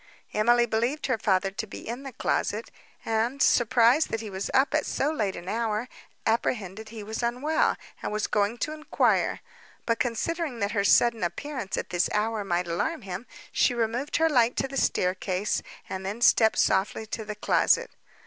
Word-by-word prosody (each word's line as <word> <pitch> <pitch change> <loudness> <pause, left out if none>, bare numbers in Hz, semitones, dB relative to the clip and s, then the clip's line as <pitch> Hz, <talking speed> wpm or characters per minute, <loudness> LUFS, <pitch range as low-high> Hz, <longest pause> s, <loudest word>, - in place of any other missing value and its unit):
Emily 240 +3 +4
believed 235 +6 -1
her 255 -4 0
father 195 -2 +1
to 220 +3 -5
be - - -9
in 240 +3 -4
the 275 -1 -7
closet, 220 -1 -1 0.3
and, 225 +4 0
surprised 240 +4 +4
that 225 - -2
he 215 -2 -7
was 190 +1 -4
up 270 +2 +3
at 305 -1 +1
so 285 +3 0
late 210 -11 -1
an 175 +1 -9
hour, 220 +2 -1 0.4
apprehended 220 -2 -1
he 220 -1 -8
was 220 +3 -4
unwell, 250 +7 +1 0.2
and - - -3
was 210 0 -1
going 210 +3 0
to 305 - -2
enquire; 310 0 +1 0.4
but, 230 -1 0
considering 275 +4 -1
that 200 -2 -1
her 200 -3 +1
sudden 230 +2 +4
appearance 260 +3 -3
at - - -4
this 175 -1 +1
hour 215 0 0
might 180 -2 -1
alarm 240 - -2
him, 190 +5 -6 0.2
she 245 - +2
removed 235 +5 -1
her 325 - +4
light 245 -6 +3
to 270 - 0
the 275 - -8
staircase, 185 -3 0 0.3
and 190 0 -5
then 200 +4 -4
stepped 225 -2 +5
softly 195 +3 +1
to 220 +1 -5
the 210 0 -6
closet. 210 - +2
225 Hz, 180 wpm, -27 LUFS, 205-250 Hz, 0.4 s, stepped